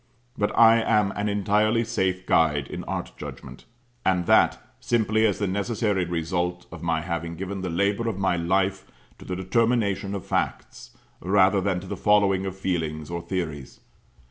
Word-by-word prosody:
But 105 - 0
I 115 0 +7
am 105 -3 +2
an 105 +1 -2
entirely 105 +3 +2
safe 95 -4 -1
guide 75 -3 +2
in - - -6
art - - -4
judgment: - - -9 0.4
and 90 -2 +1
that - - +4 0.2
simply 110 -1 +2
as 100 - -1
the 105 - -1
necessary 100 0 -1
result 85 +1 -2
of 80 -1 -9
my 80 -1 0
having 85 -1 -4
given 95 +2 -5
the 95 - -3
labour 100 +6 0
of 100 -3 -4
life 95 +1 0 0.3
to - - -12
the 90 - -4
determination 100 0 0
of 100 -1 -6
facts, - - -3 0.2
rather 95 +1 +3
than 95 -2 0
to - - -10
the - - -5
following 100 -2 +3
of 95 0 -6
feelings 80 -5 -3
or 85 0 -3
theories. 85 -6 -5
95 Hz, 165 wpm, -25 LUFS, 85-105 Hz, 0.4 s, I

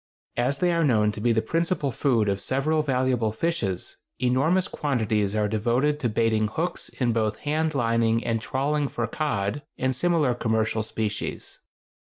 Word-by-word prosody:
As 130 +3 +1
they 175 +3 +2
are 170 0 +2
known 110 -7 +3
to 105 - -7
be 120 +1 +2
the 110 -1 +2
principal 165 +1 0
food 115 -4 +1
of 100 0 0
several 155 +4 +1
valuable 130 -5 +1
fishes, 110 - -2 0.2
enormous 140 +9 +2
quantities 110 -7 0
are 105 -1 +2
devoted 120 +8 +1
to 120 - 0
baiting 110 0 +1
hooks 165 +11 -3
in 120 -3 -1
both 110 -1 -1
hand 155 +1 0
lining 115 -2 +2
and 115 -1 0
trawling 140 +4 0
for 120 -3 -2
cod 115 -2 -2 0.2
and 130 0 0
similar 160 -4 +2
commercial 110 -2 0
species. 105 -1 -4
120 Hz, 160 wpm, -25 LUFS, 110-145 Hz, 0.2 s, known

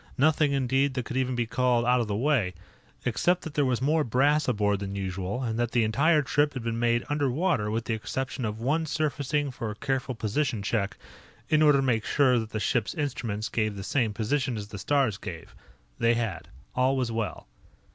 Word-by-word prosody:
Nothing, 150 +1 +3
indeed, 135 0 +1
that 125 -3 -2
could 125 - -6
even 130 -1 0
be 120 -1 0
called 120 0 +1
out 125 +1 +4
of 115 - -1
the 105 - -1
way 115 - +1 0.5
except 180 +1 +1
that 160 - -7
there 150 -2 +2
was 130 -1 0
more 155 +2 +3
brass 145 +5 +2
aboard 105 -4 +1
than 100 0 -5
usual, 95 +4 -3
and 115 -1 -2
that 120 -1 -1
the 120 -2 +3
entire 150 +8 +3
trip 145 +1 +1
had 125 - -4
been 115 0 -2
made 120 0 +1
underwater 145 - 0
with 115 +2 -2
the 115 - -1
exception 130 +4 -3
of 110 -1 -3
one 155 +7 0
surfacing 145 -2 -1
for 115 -3 -5
a 105 - -5
careful 130 +1 -2
position 110 0 -1
check, 100 -2 -1 0.5
in 155 0 +4
order 150 -2 +6
to 135 - +1
make 115 -4 +1
sure 130 -4 +3
that 110 -1 -5
the 110 - -3
ship's 110 0 0
instruments 115 -7 -2
gave 110 -2 -1
the 100 - -6
same 115 +1 +1
position 120 +3 -1
as 105 -1 -6
the 105 -2 -7
stars 135 -5 +1
gave. - - -8 0.5
They 115 0 +3
had. 110 -8 -3 0.3
All 130 +2 +2
was 125 -3 -1
well. 115 -1 -3
125 Hz, 205 wpm, -27 LUFS, 110-140 Hz, 0.5 s, order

